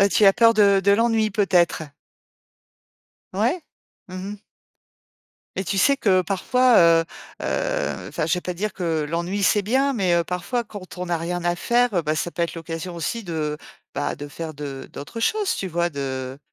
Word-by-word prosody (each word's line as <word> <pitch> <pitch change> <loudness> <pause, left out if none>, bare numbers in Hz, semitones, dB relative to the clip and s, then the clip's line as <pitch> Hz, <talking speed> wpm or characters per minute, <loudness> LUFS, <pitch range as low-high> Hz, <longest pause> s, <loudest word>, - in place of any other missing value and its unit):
Ah, 200 - +5
tu 205 - +3
as 195 - +8
peur 230 0 +5
de 200 -2 +5
de 195 +1 +3
l'ennui 225 +1 +3
peut-être? 185 -5 +2 1.5
Ouais. 230 - +1 0.5
Mmh 185 - -8 0.2
mh. - - -8 1.2
Et 190 - -1
tu 195 +2 -1
sais 280 +7 +4
que 190 -7 +3
parfois, 240 +6 +2
heu 165 -1 +5 0.4
heu, - - -2
enfin - - -2
je - - +2
vais 180 - -4
pas 180 - -3
dire 200 +3 -3
que 165 -4 -1
l'ennui, 170 +5 -2
c'est 205 +2 +3
bien, 265 +7 +1
mais, 190 -6 +1
heu, 170 - +3
parfois, 180 +8 -2
quand 200 -4 -10
on 180 - -3
n'a 170 - 0
rien 170 +1 -3
à 175 0 +1
faire, 240 +2 +2
heu, 175 - +2
bah 155 0 0
ça 165 +2 -2
peut 170 - -3
être 170 - -2
l'occasion 165 +1 -6
aussi, 195 +7 -3 0.7
bah, - - -1
de 145 +1 -7
faire 160 +2 -6
d'autres 145 - -8
choses, 420 - +1
tu 195 - -3
vois? 175 -1 0
De 135 -2 -5
185 Hz, 185 wpm, -23 LUFS, 170-215 Hz, 1.5 s, as